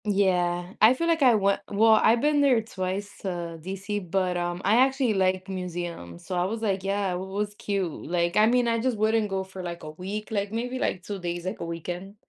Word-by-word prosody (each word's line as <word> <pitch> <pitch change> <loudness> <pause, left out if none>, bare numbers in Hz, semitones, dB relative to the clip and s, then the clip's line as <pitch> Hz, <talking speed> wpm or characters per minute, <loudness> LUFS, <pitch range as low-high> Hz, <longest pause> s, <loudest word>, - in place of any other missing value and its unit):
Yeah, 180 -3 +1
I 225 +4 +7
feel 335 - -1
like 330 -2 +2
I 250 -4 +6
went 200 -1 +2
well, 220 +2 +4
I've 220 +2 +5
been 295 0 +3
there 265 -5 +4
twice 195 -1 -4
to 170 -3 -4
DC, 195 +4 -4
but, 185 0 0
um, 175 0 -2
I 210 +4 +4
actually 265 -2 +3
like 185 -1 +1
museums. 175 - -6
So, - - -5
I 175 0 +1
was 220 +4 -3
like, 195 -3 0
yeah, 195 -1 0
it 180 - -3
was 200 +2 -3
cute. 200 -4 -2 0.2
Like, 170 0 0
I 215 +1 +6
mean, 245 +1 +3
I 230 0 +1
just 245 -1 0
wouldn't 215 0 +2
go 190 0 -1
for 190 0 -9
like 170 -1 -6
a 155 - -6
week, 195 +7 -6
like, 200 -1 -1
maybe 245 +3 -3
like 185 - -1
2 200 0 -5
days, 175 0 -4
like 185 - -4
a - - -4
weekend. 175 +4 -6
195 Hz, 225 wpm, -26 LUFS, 180-220 Hz, 0.2 s, I